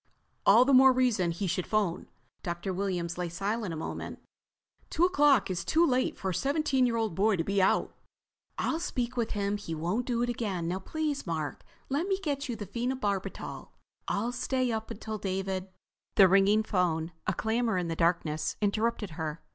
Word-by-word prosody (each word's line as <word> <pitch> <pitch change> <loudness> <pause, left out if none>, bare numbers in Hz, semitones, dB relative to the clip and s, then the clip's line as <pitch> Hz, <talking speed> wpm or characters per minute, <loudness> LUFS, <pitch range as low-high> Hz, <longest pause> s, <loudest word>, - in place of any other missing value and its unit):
"All 225 +5 +8
the 275 - +3
more 265 +1 +8
reason 245 -8 +2
he 170 +4 -3
should 185 0 -1
phone." 200 -5 0 0.3
Dr. 175 +1 -3
Williams 180 -3 -2
lay 175 -1 -2
silent 200 +3 -2
a 160 - -4
moment. 160 - -5 0.7
"Two 340 - +3
o'clock 295 - +4
is 180 - -2
too 330 +2 +3
late 255 -4 +1
for 190 - -2
a - - -2
17 275 - +1
year 235 - 0
old 220 -5 -1
boy 205 +4 +3
to 165 - -1
be 200 +2 +1
out." 190 - +2 0.6
"I'll 320 - 0
speak 250 -8 -2
to 240 -2 0
him. 205 -1 -1
He 165 -5 -5
won't 180 +10 -1
do 240 -1 +1
it - - 0
again. 200 -8 -2
Now 180 +2 -1
please, 300 +3 -3
Mark, 155 -3 -3 0.3
let 290 +7 -1
me 385 -1 +1
get 290 -7 -3
you 240 - -2
the 210 -2 -6
phenobarbital. 235 -2 -3 0.4
I'll 225 +4 0
stay 255 0 0
up 220 -1 -3
until 215 +1 -5
David—" 190 -1 -2 0.5
The 195 - +8
ringing 195 +3 +4
phone, 175 -5 0 0.2
a - - +2
clamor 225 0 0
in 180 -1 -1
the 165 - -2
darkness, 165 -2 0
interrupted 215 -1 0
her. 155 0 -5
205 Hz, 185 wpm, -29 LUFS, 180-250 Hz, 0.7 s, All